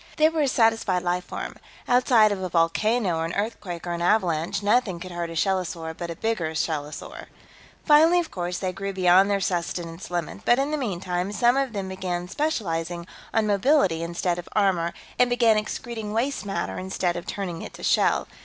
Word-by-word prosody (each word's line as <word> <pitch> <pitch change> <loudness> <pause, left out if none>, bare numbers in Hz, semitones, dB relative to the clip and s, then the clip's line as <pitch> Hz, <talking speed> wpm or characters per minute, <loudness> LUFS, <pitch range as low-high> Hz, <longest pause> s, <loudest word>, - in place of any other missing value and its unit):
They 310 0 +5
were 320 -1 -1
a 285 - +3
satisfied 225 -7 +2
life 180 0 -1
form. - - -6 0.3
Outside 245 -3 +5
of 200 -2 -2
a 185 - -3
volcano 180 +3 +1
or 165 - -1
an 165 - -4
earthquake 200 -5 -4
or 175 - -3
an 170 0 -3
avalanche, 180 0 +1
nothing 205 -4 +2
could 185 +1 -8
hurt 175 -1 -3
a 165 - -7
shellosaur 175 -3 -1
but 170 0 -6
a 170 - -4
bigger 170 -7 -2
shellosaur. 150 -2 -4 0.6
"Finally, 320 +3 +6
of 335 -2 -3
course, 175 -1 -3
they 185 -1 -2
grew 195 +1 -4
beyond 185 +1 +5
their 200 -1 +2
sustenance 175 -1 -3
limit, 170 - -3
but 240 - +4
in 275 +2 0
the - - +1
meantime, 185 -6 -2
some 240 +4 +3
of 270 -3 0
them 195 -2 -3
began 180 -2 -3
specializing 175 - -2 0.3
on 220 -1 +2
mobility 205 - +3
instead 175 +1 -1
of 175 - -9
armor 185 -5 +2 0.3
and 250 0 +5
began 235 -2 +4
excreting 215 0 -4
waste 235 -1 -1
matter 195 - -3
instead 185 -1 -1
of 175 - -6
turning 180 -5 -4
it - - -8
to - - -11
shell. - - +2
190 Hz, 190 wpm, -25 LUFS, 175-225 Hz, 0.6 s, Finally